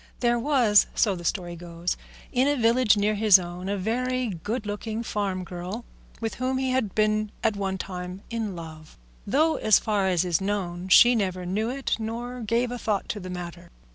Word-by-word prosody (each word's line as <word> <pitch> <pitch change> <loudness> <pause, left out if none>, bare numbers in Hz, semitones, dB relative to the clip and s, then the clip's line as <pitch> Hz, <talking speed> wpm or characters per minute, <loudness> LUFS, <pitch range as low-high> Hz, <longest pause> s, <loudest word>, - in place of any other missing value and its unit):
There 240 -1 +2
was, 240 -6 +4
so 205 -4 +2
the 175 - -8
story 175 0 -2
goes, 170 0 -4 0.4
in 255 +2 +2
a 290 - +2
village 230 -2 +4
near 205 +1 +2
his 210 -2 +7
own 180 +1 -6
a 200 - -1
very 250 +5 -1
good 210 +6 -4
looking 215 +2 -4
farm 195 -4 -2
girl 180 +6 -6 0.3
with 225 -1 -3
whom 260 +1 0
he 260 0 0
had 255 -7 -1
been 215 0 +1
at 220 -2 +2
one 195 -1 -2
time 180 +1 -6
in 220 -4 -3
love, 155 -2 -10 0.3
though, 310 +8 +2
so 215 - -3
far 205 -3 +1
as 180 -1 +2
is 175 -2 +1
known, 190 -3 -2
she 240 +6 +7
never 185 -5 -1
knew 210 +5 -1
it 270 +1 -2
nor 240 +3 -5
gave 235 +2 0
a 245 - -4
thought 210 -4 -1
to 215 - -3
the 185 -1 -8
matter. 175 -1 -7
210 Hz, 195 wpm, -26 LUFS, 185-235 Hz, 0.4 s, his